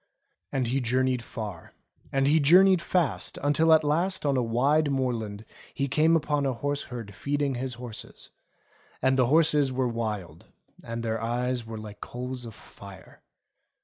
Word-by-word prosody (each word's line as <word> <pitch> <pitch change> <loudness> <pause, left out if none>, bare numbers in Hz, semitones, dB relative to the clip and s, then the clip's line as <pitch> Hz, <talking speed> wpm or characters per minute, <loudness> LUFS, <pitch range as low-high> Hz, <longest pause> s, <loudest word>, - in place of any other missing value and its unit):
And 130 -2 0
he 130 +3 0
journeyed 125 +1 +1
far, 105 -7 -8 0.4
and 135 0 +1
he 155 +3 +4
journeyed 180 +5 +6
fast, 170 -7 -1
until 160 +3 +3
at 160 -1 +6
last 170 +5 0
on 140 -1 +2
a 130 - +2
wide 140 +6 +2
moorland 115 -6 -2 0.3
he 140 - -1
came 155 +4 +3
upon 150 -2 0
a 135 -2 0
horse 145 +4 -2
herd 115 -5 -8
feeding 140 +6 -1
his 125 0 -3
horses; 120 -2 -9 0.7
and 130 0 +2
the 130 -2 +3
horses 150 -1 +4
were 130 0 0
wild, 105 -9 -4 0.4
and 115 0 -5
their 115 -1 -2
eyes 120 +1 -2
were 110 0 -6
like 105 -1 -10
coals 125 0 -6
of 115 -2 -9
fire. 100 -3 -14
130 Hz, 160 wpm, -27 LUFS, 115-145 Hz, 0.7 s, journeyed